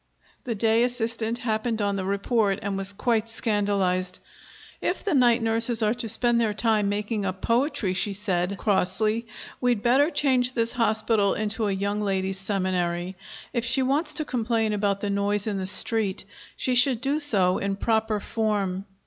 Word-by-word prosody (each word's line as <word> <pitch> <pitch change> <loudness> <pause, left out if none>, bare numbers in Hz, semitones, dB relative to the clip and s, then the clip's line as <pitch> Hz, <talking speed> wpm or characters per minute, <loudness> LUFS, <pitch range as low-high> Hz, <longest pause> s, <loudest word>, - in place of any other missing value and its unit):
The 235 -3 -3
day 225 +2 +2
assistant 230 -2 -1
happened 225 -1 -2
on 200 -1 0
the 190 - -3
report, 200 +1 0
and 200 -1 -2
was 195 0 0
quite 225 +2 -1
scandalized. 200 -5 0 0.6
"If - - -2
the 405 - -1
night 245 -3 +3
nurses 230 +1 +2
are 215 +1 +2
to 240 -2 -3
spend 235 +1 +4
their 215 -2 0
time 215 -2 +1
making 210 +1 -2
up 190 -1 -4
poetry," 240 -4 0
she 200 +2 +1
said 190 -1 -1
crossly, 215 +3 0 0.3
"we'd 245 -4 +1
better 270 +5 +3
change 260 -5 +1
this 230 -2 +2
hospital 220 -3 +1
into 215 +1 -1
a - - 0
young 200 +2 -2
ladies' 195 -1 -2
seminary. 185 -2 -2 0.4
If 235 -3 -1
she 265 +2 +2
wants 295 +4 0
to 310 - +1
complain 230 -4 -1
about 200 -1 -1
the 205 - -2
noise 200 0 0
in 205 -3 -2
the 185 - -2
street, 210 -1 +2 0.3
she 255 - 0
should 250 -1 +3
do 275 +4 -1
so 195 -11 +3
in 200 0 -2
proper 220 0 0
form." 200 -4 -2
215 Hz, 170 wpm, -25 LUFS, 200-235 Hz, 0.6 s, spend